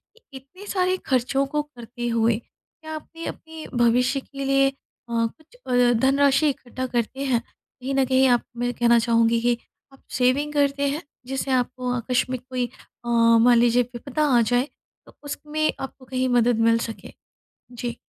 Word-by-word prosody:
कि 460 - -24
इतने 275 +10 -12
सारे 370 -1 +1
खर्चों 265 +1 +1
को 295 +2 -1
करते 240 -4 -8
हुए 230 -1 +2
क्या 315 +6 -13
आपने 330 +2 -9
अपने 320 -1 -8
भविष्य 245 +3 +3
के 275 +1 -8
लिए 275 0 +3
अ, - - -11 0.4
कुछ 235 - -3
अ, 245 -1 +4
धनराशि 275 +3 +3
इकट्ठा 260 -1 -5
करते 245 +1 -2
हैं? 250 -3 +2 0.4
कहीं 265 +2 -3
न 270 -1 +3
कहीं 260 +1 +3
आप 245 -1 +4 0.2
मैं 245 0 -1
कहना 235 -1 +4
चाहूँगी 230 0 +2
कि 240 0 +2 0.4
आप 270 - -20
सेविंग 265 +4 +1
करते 280 -1 +1
हैं 295 +4 -3 0.3
जिससे 270 +1 -3
आपको 250 0 0
आकस्मिक 250 +1 -1
कोई 255 -1 -1 0.4
अ, - - -4 0.3
मान 240 0 +6
लीजिए 240 +1 +4
विपदा 275 +5 -2
आ - - +5
जाए 245 +3 +1 0.4
तो - - -18
उसमें 300 +1 -2
आपको 270 0 -8
कहीं 255 0 -1
मदद 240 -1 +3
मिल 230 0 +4
सके? 225 -1 -7 0.6
जी। 240 -1 -5
255 Hz, 165 wpm, -24 LUFS, 240-275 Hz, 0.6 s, मान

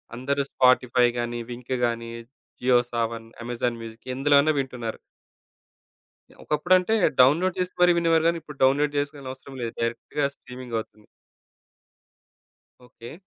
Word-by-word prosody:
అందరూ 140 +3 -1
స్పాటిఫై 125 -1 +4
గానీ, 120 0 -3
వింక్ 125 +1 -4
గానీ, 115 0 -3 0.5
జియో 125 0 +4
సావన్, 115 -1 -2 0.2
అమెజాన్ 120 0 -2
మ్యూజిక్ 115 +1 -11
ఎందులో 145 +2 +3
అన్నా 155 +2 +2
వింటున్నారు. 125 -4 -4 1.3
యాహ్! - - -22
ఒకప్పుడంటే 180 +7 +2 0.3
డౌన్‌లోడ్ 165 +8 +3
జేసి 180 0 -2
మరి 175 -1 +6
వినేవారు 165 -1 +2
గానీ, 170 0 +2
ఇప్పుడు 150 -2 -12
డౌన్‌లోడ్ 145 +2 +3
చేసుకోవాల్సిన 140 -2 -5
అవసరం 130 +1 -12
లేదు. 115 -1 -4
డైరెక్ట్‌గా 120 +5 -1
స్ట్రీమింగవుతుంది. 115 -4 -7 1.8
ఓకే. 120 -1 -12
130 Hz, 120 wpm, -25 LUFS, 120-145 Hz, 1.8 s, మరి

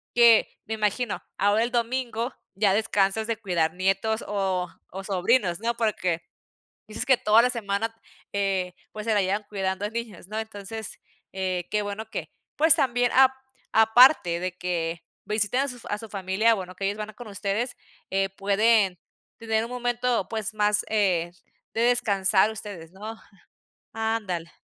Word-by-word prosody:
que 235 -2 +7 0.2
me 220 - -3
imagino 215 +1 -1 0.2
ahora 205 +3 +3
el 240 - -2
domingo 240 0 -1 0.2
ya 200 -1 +3
descansas 205 0 +1
de 230 -1 -1
cuidar 170 -5 0
nietos 195 +4 0
o 190 -3 -1 0.2
o 195 +2 -6
sobrinos, 190 -1 +1
¿no?, 235 +1 0
porque 185 -7 0 0.7
dices 215 - -4
que 265 - +5
toda 215 +2 +5
la 250 - +3
semana, 225 -1 -2 0.4
eh, 195 -3 -1 0.2
pues 215 0 -7
se 225 - +2
la 205 - +3
llevan 200 +3 -1
cuidando 190 -1 -2
a - - -5
niños, 225 -6 -6
¿no? 215 +1 -4
Entonces, 220 0 -7 0.3
eh, 185 -2 -2
qué 210 - +1
bueno 205 +2 -5
que - - -5 0.3
pues 320 0 +7
también 245 -2 +2
ap 265 0 +7 0.4
aparte 220 - +6
de 185 0 -3
que 170 -2 -2 0.2
visiten 210 +4 0
a 280 - -1
sus 245 -3 -9
a 205 - -1
su 225 +1 -9
familia, 195 +3 +2
bueno, 185 -3 -7
que 195 - -5
ellos 200 +2 -2
van 210 0 -4
a - - -19
con 245 - -10
ustedes, 205 +5 -2 0.3
eh, 195 0 +1
pueden 200 -1 +2 0.4
tener 220 -1 0
un 235 - -8
momento 245 0 -1
pues 220 -1 -1
más, 210 0 +2
eh, 185 -6 +1 0.4
de 225 - -1
descansar 210 -4 +3
ustedes, 200 -6 -8
¿no? 215 +4 -7 0.8
Ándale. 215 -7 -2
210 Hz, 165 wpm, -26 LUFS, 190-230 Hz, 0.8 s, que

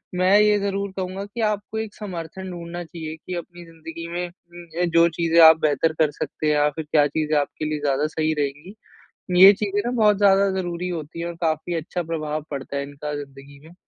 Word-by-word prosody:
मैं 185 +3 +4
ये 210 0 +4
ज़रूर 200 0 -2
कहूँगा 190 +1 -4
कि 215 +3 -6
आपको 210 0 -1
एक 220 -1 -5
समर्थन 185 -2 -7
ढूँढ़ना 175 0 -6
चाहिए, 160 -1 -7
कि 180 +3 -9
अपनी 175 0 -8
ज़िंदगी 165 0 -9
में 175 +1 -3
उम, 175 -1 -6
जो 170 0 +5
चीज़े 165 0 +1
आप 160 - +5
बेहतर 155 +1 +2
कर 155 -2 +3
सकते 155 +1 -4
हैं 150 - +3
या 150 0 +3
फ़िर 150 +1 -6
क्या 150 -2 +5
चीज़े 155 +1 -1
आपके 145 +2 -4
लिए 155 0 -2
ज़्यादा 145 +1 0
सही 155 0 -1
रहेंगी, 145 +7 -4 0.7
ये 195 - +12
चीज़ें 205 0 -1
ना 240 - -1
बहुत 210 -1 +5
ज़्यादा 200 -1 +4
ज़रूरी 175 0 -3
होती 165 -2 -6
है 170 - -3
और 170 - -6
काफ़ी 160 +1 -1
अच्छा 170 +2 -3
प्रभाव 155 -2 -3
पड़ता 140 0 -5
है 140 - -2
इनका 145 +1 -6
ज़िंदगी 140 0 -10
में। 170 - -15
170 Hz, 210 wpm, -23 LUFS, 155-185 Hz, 0.7 s, ये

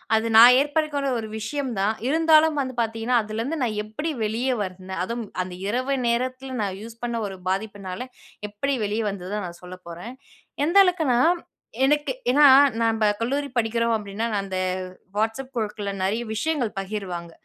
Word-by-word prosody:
அது 220 +1 +1
நான் 240 +3 +10
ஏற்படுத்திக்கொண்ட 290 -1 0
ஒரு 220 - -5
விஷயம் 260 +4 -3
தான். 205 +3 +2
இருந்தாலும் 315 0 +4
வந்து 260 -1 -4
பாத்தீங்கன்னா, 225 +2 -1
அதுலருந்து 225 +9 -3
நான் 215 -3 -1
எப்படி 220 +10 -4
வெளியே 235 +5 0
வந்தேன்? 190 -1 -5
அதும் 235 +4 -3 0.2
அந்த 180 0 -5
இரவு 255 +5 0
நேரத்தில 255 +2 -1
நான் 195 -2 -2
யூஸ் 230 +1 -11
பண்ண 235 -1 -2
ஒரு 195 - -7
பாதிப்பினால 195 0 -3 0.5
எப்படி 275 +7 -2
வெளியே 210 +2 -1
வந்ததுதான், 195 +1 -4
நான் 170 0 -11
சொல்லப் 180 0 -11
போறேன். 175 +8 -8 0.5
எந்த 345 +5 +2
அளவுக்குனா, 320 -9 +2 0.7
எனக்கு 295 +2 +2 0.2
ஏன்னா, 290 +2 +6 0.4
நம்ப 225 -1 +2 0.2
கல்லூரி 280 +4 -1
படிக்கிறோம். 230 0 +1
அப்படின்னா, 205 +1 -4
நான் 200 -1 0
அந்த 190 -1 -3 0.6
Whatsapp 225 +5 -2
குழுக்கள்ல 210 -3 -3
நிறைய 205 +5 0
விஷயங்கள் 255 -1 -1
பகிர்வாங்க. 190 -4 -5
225 Hz, 150 wpm, -24 LUFS, 205-265 Hz, 0.7 s, நான்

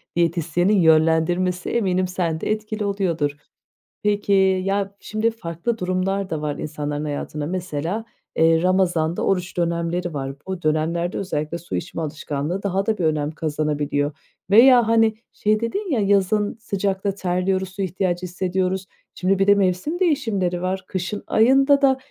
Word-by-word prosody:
diyetisyenin 170 +2 +1
yönlendirmesi 165 +3 +3
eminim 185 -5 +1
sen 170 -3 -2
de - - -1
etkili 215 0 -2
oluyordur. 175 -7 0 0.7
Peki, 205 -1 +1 0.3
ya, 195 0 -1
şimdi 215 +2 -1
farklı 205 +2 -4
durumlarda 185 -3 -1
var 150 -1 -2
insanların 150 -1 -4
hayatında 145 0 -4
mesela, 180 +4 -3 0.3
eee, 165 0 +4
Ramazan'da 175 -3 +1
oruç 185 -1 -1
dönemleri 170 0 -1
var. 135 -1 -4
Bu 190 -2 -4
dönemlerde 165 +3 0
özellikle 155 -4 -3
su 170 0 -6
içme 165 0 -4
alışkanlığı 155 +3 -3
daha 195 0 0
da 220 0 0
bir 175 - 0
önem 150 -1 0
kazanabiliyor 150 -2 -1 0.4
veya 240 +3 +7
hani 225 -1 +4 0.2
şey 215 0 +1
dedin, 365 - -3
ya, 255 - +2
yazın 205 +1 +2
sıcakta 195 -2 -2
terliyoruz, 185 0 -1
su 195 +1 -6
ihtiyacı 185 -1 -1
hissediyoruz, 185 +1 -1 0.3
şimdi 190 +1 +1
bir 195 - +2
de 205 - +7
mevsim 195 - 0
değişimleri 220 - 0
var, 185 +1 -2
kışın 185 +2 -4
ayında 270 +5 +4
da 265 -2 +4
185 Hz, 140 wpm, -22 LUFS, 165-200 Hz, 0.7 s, veya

